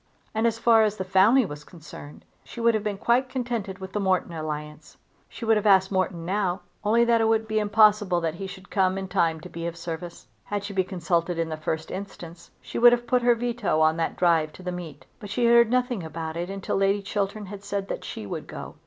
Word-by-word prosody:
And, 220 +2 +2
as 225 -1 -1
far 230 -1 +5
as 215 -1 +1
the 190 - -2
family 195 +7 +4
was 150 -4 -8
concerned, 150 -3 -12 0.2
she - - -11
would 235 0 +3
have 215 -2 -1
been 210 -2 -2
quite 245 +5 +1
contented 235 -7 -3
with 190 -1 -9
the 210 - -1
Morton 185 -3 0
alliance. 150 -1 -6 0.3
She 230 - -8
would 225 -1 +4
have 210 0 0
asked 190 -1 +5
Morton 185 -3 -1
now 190 0 -1 0.2
only 230 +3 +3
that 235 -1 +3
it 225 - +3
would 220 0 +1
be 215 0 0
impossible 210 -3 +4
that 165 -2 -1
he 195 +3 -6
should 190 +1 -12
come 190 -2 +2
in 195 0 -4
time 170 -4 +1
to - - -9
be 170 0 -5
of 170 0 -6
service. 170 0 -7 0.2
Had 205 -1 -3
she 200 0 -6
been 190 -1 +1
consulted 175 -2 -1
in 165 -1 -1
the 155 - -3
first 155 +1 -4
instance 175 -4 -8
she - - -5
would 240 0 +8
have 240 0 -1
put 250 +1 +2
her 240 0 +4
veto 230 -8 -1
on 160 +1 +3
that 165 - -1
drive 165 -3 +2
to 185 - -13
the 180 - -3
meet: 160 -7 -8
but 205 -3 -9
she 235 +4 0
had 235 - +5
heard 235 -1 +6
nothing 250 -3 0
about 160 0 -6
it 175 +2 -3
until 195 0 -3
Lady 195 +1 +1
Chiltern 205 +1 -3
had 200 +1 -9
said 200 -1 -3
that - - -5
she 105 - -7
would - - -6
go. - - -8
195 Hz, 240 wpm, -25 LUFS, 170-220 Hz, 0.3 s, would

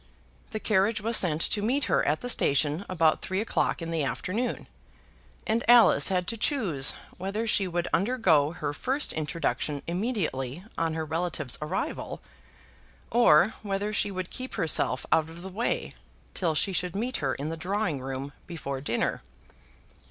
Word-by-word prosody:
The 215 - -4
carriage 210 +1 +2
was 230 +3 0
sent 165 -6 +3
to 205 - +1
meet 255 +7 +1
her - - +2
at 150 +2 +1
the 245 - -4
station 150 - +2
about 165 -4 +2
three 190 +1 -2
o'clock 210 -5 0
in 165 - -4
the 160 -2 0
afternoon, 210 - -2 0.8
and 225 +2 +1
Alice 235 -12 +7
had 180 -2 +1
to 230 - -4
choose 195 - +1 0.2
whether 200 +5 -2
she 205 -3 +2
would 175 -1 -2
undergo 185 - +3
her 150 -4 -4
first 265 - -1
introduction 150 -2 -2
immediately 170 - -2
on 165 -1 -1
her 160 -1 -2
relative's 160 -4 -1
arrival, 160 +5 -3 0.9
or 205 -5 +5
whether 205 +1 -2
she 205 - +1
would 185 -2 -5
keep 255 +1 -6
herself 165 -6 +1
out 160 0 +3
of 170 +2 -10
the 190 - -6
way 215 +6 -2 0.4
till 165 -4 0
she 195 +5 +1
should 180 0 -1
meet 245 +5 -1
her 135 -3 -1
in 145 +3 -4
the 165 - -3
drawing 180 -3 -2
room 135 +2 -5
before 140 -6 -5
dinner. 120 -4 -1
180 Hz, 160 wpm, -27 LUFS, 150-215 Hz, 0.9 s, Alice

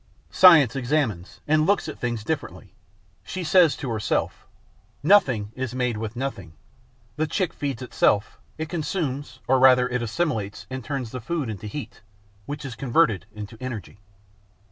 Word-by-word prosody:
Science 160 -10 +7
examines 125 - -1
and 155 +1 +3
looks 200 -3 +2
at 155 - -7
things 120 -3 -2
differently. - - -5 0.5
She 185 - -5
says 170 -1 +5
to 135 -6 -4
herself: 110 -3 -2 0.6
'Nothing 130 - +4
is 130 -1 -4
made 125 -2 0
with 110 +1 -5
nothing. 120 -11 -5 0.6
The 155 +1 0
chick 185 +2 -1
feeds 135 -3 -4
itself; 105 -4 +1 0.2
it 160 0 -3
consumes 145 -5 -3
or 130 0 +4
rather 130 -1 +6
it 125 -1 -2
assimilates 115 -5 -2
and 130 -1 -5
turns 135 -4 -4
the 125 - -6
food 145 -2 -2
into 105 +1 -7
heat, 145 +6 -7 0.5
which 145 0 -5
is 135 - -5
converted 120 - +1
into 105 +2 -8
energy.' 110 -6 -6
130 Hz, 150 wpm, -24 LUFS, 110-150 Hz, 0.6 s, Science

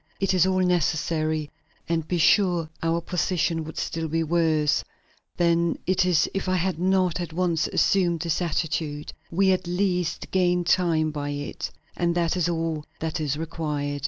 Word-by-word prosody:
It 195 -1 +1
is 185 0 +4
all 185 0 +2
necessary, 155 -3 0 0.4
and 165 -2 -1
be 180 - 0
sure 175 -1 +3
our 165 +1 0
position 170 -1 0
would 160 - -8
be - - -2
still 165 0 -3 0.2
worse 155 -3 +2 0.5
than 170 -1 +2
it 185 0 +2
is 175 -4 +3
if 195 -1 -2
I 185 - +2
had 180 -2 -1
not 185 -1 +2
at 170 -2 -5
once 170 -2 +1
assumed 175 -4 +2
this 170 0 -1
attitude; 155 -3 -2 0.2
we 190 +3 +3
at 185 -1 0
least 180 -2 -1
gain 180 -1 +2
time 170 -3 +2
by 145 -1 -4
it, 145 0 -4 0.3
and 170 -1 0
that 170 -1 +1
is 175 -2 +1
all 165 -2 -2
that 160 +1 -3
is 150 -2 -1
required. 150 -3 -3
170 Hz, 165 wpm, -25 LUFS, 155-180 Hz, 0.5 s, is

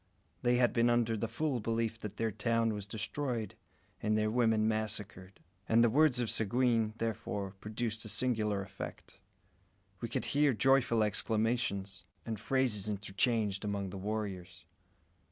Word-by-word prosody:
They 125 0 +3
had 120 -1 +3
been 120 0 +3
under 120 -1 +2
the 110 +1 -2
full 145 0 -1
belief 115 0 -1
that 105 -1 -7
their 115 -1 0
town 115 +1 +1
was 105 -1 -6
destroyed 110 +1 -3 0.5
and 110 0 +1
their 110 0 +1
women 110 -2 +3
massacred; 105 -3 -3 0.3
and 115 +1 +5
the 120 - +4
words 145 -1 +4
of 120 -3 0
Seguin, 115 0 +1
therefore 105 -3 -3
produced 110 +1 -3
a 110 - -7
singular 105 -5 +1
effect. 95 0 -9 0.8
We - - -4
could - - -2
hear 145 -1 +4
joyful 125 -2 +3
exclamations 105 -2 -1 0.2
and 110 -3 -4
phrases 115 -4 +1
interchanged 105 0 0
among 100 -2 -2
the 100 - -6
warriors. 95 -5 -4
110 Hz, 145 wpm, -33 LUFS, 105-120 Hz, 0.8 s, and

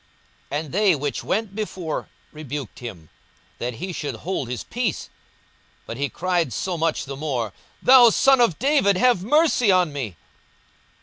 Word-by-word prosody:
42:018:039 145 - 0
And 145 - -12
they 200 -2 +4
which 145 0 -3
went 215 -1 -2
before 185 -7 -4 0.2
rebuked 145 -5 -7
him, 95 -10 -9 0.5
that 120 0 -3
he 185 +10 -5
should 150 - -4
hold 170 -9 -4
his 125 - -4
peace: 240 -5 -3 0.7
but - - -6
he 140 +3 -2
cried 175 -5 -1
so 185 +6 -2
much 165 -1 -1
the 135 0 -6
more, 130 -8 -3 0.3
Thou 250 -2 +8
son 265 +3 +4
of 210 -10 +3
David, 265 -8 +3
have 245 -4 +3
mercy 280 -3 +3
on 180 -5 +2
me. 120 -10 -5
175 Hz, 160 wpm, -23 LUFS, 140-215 Hz, 0.7 s, Thou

